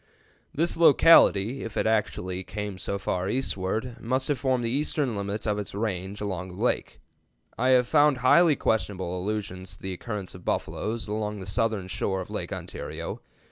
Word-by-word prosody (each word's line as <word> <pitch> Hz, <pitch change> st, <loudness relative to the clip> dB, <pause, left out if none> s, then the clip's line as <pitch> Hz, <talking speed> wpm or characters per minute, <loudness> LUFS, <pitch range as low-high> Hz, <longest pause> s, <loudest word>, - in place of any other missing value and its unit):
"This 165 Hz, +4 st, +1 dB
locality, 135 Hz, -8 st, +6 dB
if 115 Hz, -, -6 dB
it -, -, +1 dB
actually 95 Hz, -4 st, 0 dB
came 105 Hz, -1 st, -5 dB
so 100 Hz, -, -2 dB
far 95 Hz, -1 st, -2 dB
eastward, 115 Hz, 0 st, -2 dB
must 130 Hz, +4 st, -1 dB
have 145 Hz, -4 st, 0 dB
formed 130 Hz, 0 st, +1 dB
the 115 Hz, -, 0 dB
eastern 140 Hz, -2 st, 0 dB
limit 100 Hz, +1 st, -3 dB
of 105 Hz, -1 st, 0 dB
its 100 Hz, -, -6 dB
range 100 Hz, -2 st, -3 dB
along 95 Hz, -3 st, -3 dB
the 90 Hz, -, -10 dB
lakes. 125 Hz, -, 0 dB, 0.6 s
I 125 Hz, +4 st, 0 dB
have 125 Hz, -, +2 dB
found 145 Hz, -2 st, +4 dB
only -, -, -10 dB
highly 160 Hz, +5 st, +6 dB
questionable 95 Hz, -7 st, -1 dB
allusions 95 Hz, -2 st, -4 dB
to -, -, -22 dB
the 95 Hz, 0 st, -3 dB
occurrence 100 Hz, 0 st, -5 dB
of 90 Hz, -, -12 dB
buffaloes 110 Hz, +1 st, -2 dB
along 105 Hz, 0 st, -3 dB
the 95 Hz, -, -7 dB
southern 110 Hz, -1 st, -1 dB
shore 95 Hz, 0 st, -2 dB
of 95 Hz, -, -7 dB
Lake -, -, -4 dB
Ontario. -, -, -6 dB
105 Hz, 180 wpm, -27 LUFS, 95-125 Hz, 0.6 s, locality